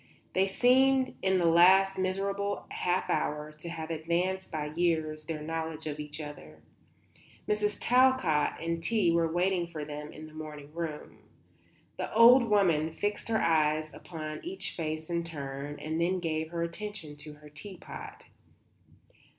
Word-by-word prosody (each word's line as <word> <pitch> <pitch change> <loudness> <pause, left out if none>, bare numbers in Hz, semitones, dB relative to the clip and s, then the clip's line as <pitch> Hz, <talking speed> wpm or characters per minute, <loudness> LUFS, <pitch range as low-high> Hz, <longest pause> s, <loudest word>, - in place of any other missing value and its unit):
They 190 +1 +3
seemed 260 +5 +4
in 190 0 +2
the 175 - +2
last 190 +3 +6
miserable 195 +2 -1
half 180 +1 0
hour 150 0 -1
to 150 +3 -9
have 165 -1 -5
advanced 175 +4 -1
by 150 -1 -3
years 160 -2 0
their 155 -1 -4
knowledge 160 0 -4
of 150 -1 -4
each 150 0 -6
other. 80 - -9 0.8
Mrs. 210 -1 0
Talcott 250 - +3
and 165 0 -2
tea 205 -2 +2
were 165 -1 +2
waiting 175 0 +1
for 155 -3 -6
them 150 0 -7
in 155 - -10
the 155 - -13
morning 150 -2 -9
room. 165 -3 -5 0.8
The - - -4
old 240 +2 +8
woman 175 -8 +3
fixed 205 +6 -3
her 225 -1 +1
eyes 155 -1 +2
upon 155 -3 -7
each 365 +3 -3
face 155 -1 -4
in 170 -1 -1
turn 145 -2 -6
and 160 +2 -2
then 180 +2 +2
gave 160 -2 -2
her 170 0 -2
attention 170 -3 -6
to 150 +1 -10
her 150 0 -15
tea 185 +6 -9
pot. - - -9
165 Hz, 155 wpm, -30 LUFS, 155-190 Hz, 0.8 s, old